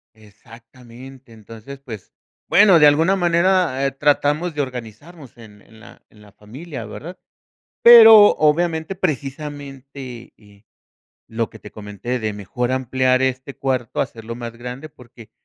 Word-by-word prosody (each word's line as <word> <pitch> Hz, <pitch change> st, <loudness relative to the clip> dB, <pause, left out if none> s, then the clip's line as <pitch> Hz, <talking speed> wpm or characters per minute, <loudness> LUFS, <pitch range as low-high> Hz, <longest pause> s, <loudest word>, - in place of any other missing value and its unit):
Exactamente. 115 Hz, +4 st, -17 dB
Entonces, 115 Hz, +5 st, -13 dB
pues, 110 Hz, -8 st, -11 dB, 0.4 s
bueno, 195 Hz, -3 st, +5 dB
de 150 Hz, -, +5 dB
alguna 160 Hz, +6 st, +3 dB
manera, 175 Hz, -5 st, +1 dB
eh, 135 Hz, -, 0 dB
tratamos 150 Hz, +4 st, -1 dB
de 145 Hz, -, -4 dB
organizarnos 130 Hz, +4 st, -10 dB
en 105 Hz, -3 st, -16 dB
en 110 Hz, +2 st, -21 dB
la -, -, -17 dB
en 105 Hz, -, -21 dB
la 105 Hz, -, -18 dB
familia, 130 Hz, -, -10 dB
¿verdad? 165 Hz, -, -10 dB, 0.7 s
Pero, 225 Hz, -3 st, +8 dB
obviamente, 160 Hz, +2 st, 0 dB
precisamente, 140 Hz, -5 st, -7 dB
eh, 105 Hz, -1 st, -22 dB, 0.7 s
lo 115 Hz, 0 st, -3 dB
que 110 Hz, -, -15 dB
te 105 Hz, -, -13 dB
comenté 105 Hz, +4 st, -6 dB
de 110 Hz, -2 st, -4 dB
mejor 120 Hz, +5 st, -4 dB
ampliar 130 Hz, 0 st, 0 dB
este 130 Hz, +1 st, -3 dB
cuarto, 130 Hz, -4 st, -3 dB
hacerlo 115 Hz, 0 st, -6 dB
más 120 Hz, -1 st, -8 dB
grande, 125 Hz, +5 st, -9 dB
porque 120 Hz, -4 st, -17 dB
130 Hz, 135 wpm, -19 LUFS, 115-150 Hz, 0.7 s, Pero